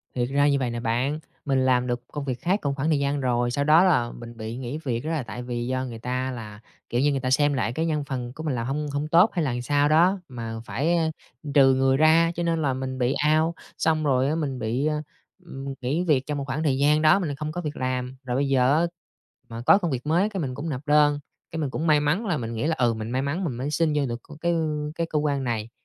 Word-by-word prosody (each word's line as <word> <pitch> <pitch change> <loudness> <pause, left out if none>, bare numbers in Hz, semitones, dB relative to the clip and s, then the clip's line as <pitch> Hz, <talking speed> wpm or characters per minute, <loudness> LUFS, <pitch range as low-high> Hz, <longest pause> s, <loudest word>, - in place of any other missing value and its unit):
Thiệt 120 0 0
ra 140 +1 +3
như 140 -1 +2
vậy 125 - -1
nè 120 0 -4
bạn, 125 +6 -1 0.3
mình 135 -2 +2
làm 125 -1 +2
được 120 0 -2
công 145 -2 -6
việc 130 -2 -3
khác 190 +4 +1
cùng 140 -1 -1
khoảng 145 +3 -1
thời 150 -3 +2
gian 140 +1 0
rồi, 120 -1 +1
sau 140 +3 0
đó 155 +5 +6
là 135 -11 +2
mình 120 -1 -10
bị 110 +1 -5
nghỉ 130 +3 -4
việc, 120 -4 -1
đó 160 - -2
là 155 -6 -1
tại 115 +2 -7
vì 120 -1 -3
do 130 0 -1
người 115 -3 -7
ta 125 +2 -2
là, 110 -4 -8 0.3
kiểu 120 - 0
như, 145 +1 +3
người 135 - 0
ta 130 -1 -2
xem 145 +2 +3
lại 125 -3 -1
cái 160 +4 -1
nhân 150 -3 0
phần 125 -3 -5
của 155 - -8
mình 145 -5 -1
làm 115 0 -2
hông 150 +2 -2
hông 145 +1 -1
tốt 175 +7 +5
hay 170 -5 0
là 130 - 0
làm 120 0 -3
sao 145 +3 +2
đó, 175 +5 +4
mà 115 -3 -6
phải, 165 +5 0
ơ, 160 -1 +1 0.4
trừ 135 -2 +6
người 135 0 +3
ra, 160 +2 +5
cho 175 - -2
nên 165 -1 0
là 135 -3 +1
mình 130 0 -4
bị 125 +1 +1 0.2
out. 165 +1 0 0.2
Xong 160 -1 +1
rồi 135 -2 +2
á, 155 - 0
mình 140 -6 -2
bị, 120 +5 -1
ơ, 150 -1 0 0.4
ừm, 135 -3 -6
nghỉ 145 +8 0
việc 145 -7 +2
trong 150 -1 -3
một 140 - -3
khoảng 135 +4 -2
thời 135 -4 +1
gian 150 +2 +3
đó 155 +5 +5
mình 155 -7 -2
không 150 +2 -4
có 175 +3 -4
việc 150 -2 -4
làm, 130 0 -2
rồi 125 -1 -3
bây 140 +2 +1
giờ 135 +2 +3
á, 170 - +2 0.6
mà 115 +1 -6
có 200 - +7
công 175 -5 -2
việc 130 +1 -3
mới 175 +7 +2
cái 195 -3 -4
mình 130 -4 -3
cũng 150 +4 -4
nộp 135 -3 -3
đơn. 145 -1 +4 0.3
Cái 165 - -4
mình 145 - -1
cũng 160 +5 -3
may 150 -1 +5
mắn 150 +10 0
là, 175 -7 0
mình 115 -2 -4
nghĩ 115 +7 -1
là, 165 - +1
ừ, 120 -2 +2
mình 110 +1 -5
may 130 +1 0
mắn 150 +7 -2
mình 150 - -2
mới 140 +4 -3
xin 155 0 +1
vô 145 -2 +1
được 120 -1 -4
c 150 +1 -13
cái, 170 - +1
ư, 155 -3 -1
cái 165 - -1
cơ 150 - +1
quan 145 -2 0
này, 115 -2 -2
140 Hz, 285 wpm, -25 LUFS, 125-155 Hz, 0.6 s, có